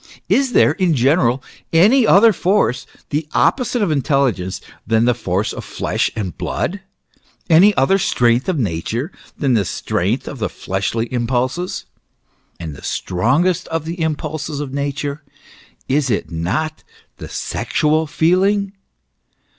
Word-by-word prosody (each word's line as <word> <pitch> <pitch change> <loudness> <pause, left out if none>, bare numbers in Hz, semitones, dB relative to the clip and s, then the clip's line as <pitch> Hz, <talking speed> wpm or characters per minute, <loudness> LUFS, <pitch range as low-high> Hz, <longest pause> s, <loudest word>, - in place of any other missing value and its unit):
Is 265 -2 +2
there, - - +5
in 185 -5 +1
general, 130 -1 +2 0.3
any 215 +9 +5
other 215 +3 +6
force, 180 - +1 0.2
the 150 +1 -1
opposite 245 -3 +2
of 185 - 0
intelligence, 135 -10 0 0.3
than 115 +1 +3
the 125 - +4
force 100 -3 -2
of - - -7
flesh - - -1
and 95 -6 -4
blood, 200 +4 -3 0.7
any 190 +6 +6
other 195 +9 +3
strength 120 -3 +2
of 180 - 0
Nature 115 - -2 0.3
than 135 -3 +1
the 110 -4 +3
strength 100 +7 -2
of 135 - -7
the 110 - -1
fleshly 100 +4 -2
impulses? 125 +8 -1 0.7
And 80 -4 -6
the - - -12
strongest 155 - 0
of 165 -1 -3
the 165 +1 -5
impulses 155 -1 -3
of 140 -3 -5
Nature, 140 +1 -3 0.7
is 135 0 +1
it 105 - -1
not 105 - -2 0.3
the - - -9
sexual 155 +1 0
feeling 195 +6 +2
145 Hz, 135 wpm, -19 LUFS, 120-170 Hz, 0.7 s, other